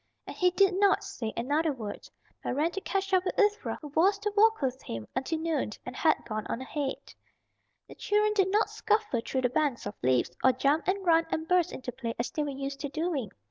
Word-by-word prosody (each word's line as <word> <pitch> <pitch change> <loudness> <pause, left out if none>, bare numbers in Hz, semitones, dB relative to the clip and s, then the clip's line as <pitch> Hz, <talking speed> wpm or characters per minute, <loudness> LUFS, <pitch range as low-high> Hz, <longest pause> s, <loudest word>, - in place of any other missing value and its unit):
And - - -8
he 360 - +3
did 385 +1 +3
not 405 -1 +4
say 225 -2 -5
another 295 +7 +1
word, 220 -7 -7 0.3
but - - -2
ran 310 +4 +1
to 390 - -4
catch 390 0 -2
up 370 -1 +4
with 370 - -3
Ivra 420 0 +2
who 295 - -6
was 365 +8 +3
to 415 0 -3
walk 445 +1 +5
with 260 -2 -2
him 115 -1 -6
until 265 +5 -1
noon 315 -9 -1
and 250 - -7
had 315 +2 +2
gone 215 -2 -4
on - - -3
ahead. 270 +1 -4 0.7
The - - -11
children 425 0 +1
did 390 -2 +2
not 425 +2 +2
scuffle 425 - 0
through 260 - -1
the 250 - +2
banks 285 -2 0
of 205 - -4
leaves, 125 0 +2
or 260 - +6
jump 280 +5 +1
and 385 +1 0
run 330 -1 +4
and 320 0 -2
burst 360 -1 +3
into 255 - -6
play 235 -2 -5
as 235 - -2
they 305 - -2
were 295 - -1
used 275 0 -5
to 285 0 -4
doing. 310 - -2
310 Hz, 225 wpm, -29 LUFS, 260-380 Hz, 0.7 s, or